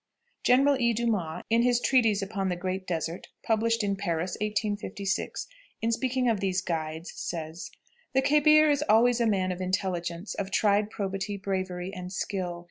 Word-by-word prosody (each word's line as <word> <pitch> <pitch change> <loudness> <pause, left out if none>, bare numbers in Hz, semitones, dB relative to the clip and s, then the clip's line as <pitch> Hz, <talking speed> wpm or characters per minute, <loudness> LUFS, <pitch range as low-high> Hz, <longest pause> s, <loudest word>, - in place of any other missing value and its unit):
General 270 +2 +4
E. 235 0 +3
Dumas, 210 -8 -1
in 230 +1 +5
his 245 0 +3
treatise 225 -6 +3
upon 195 -1 -2
the 180 - 0
"Great 185 +1 -4
Desert," 165 0 -3 0.2
published 230 0 +1
in 200 -1 0
Paris, 175 -2 -2
1856, 210 -1 -2 0.3
in 230 - 0
speaking 255 +1 0
of 225 -4 +2
these 190 -1 0
guides, 160 -2 -4
says: 165 0 -5 0.4
"The 265 0 +3
khebir 305 +2 +5
is 290 0 +1
always 240 +2 +5
a 235 - +3
man 190 -3 +1
of 180 0 -5
intelligence, 180 -1 -2
of 195 -1 -4
tried 205 +1 +2
probity, 195 0 -3
bravery, 190 -1 -3
and 180 -2 -7
skill. 180 -2 -3
200 Hz, 160 wpm, -28 LUFS, 185-230 Hz, 0.4 s, in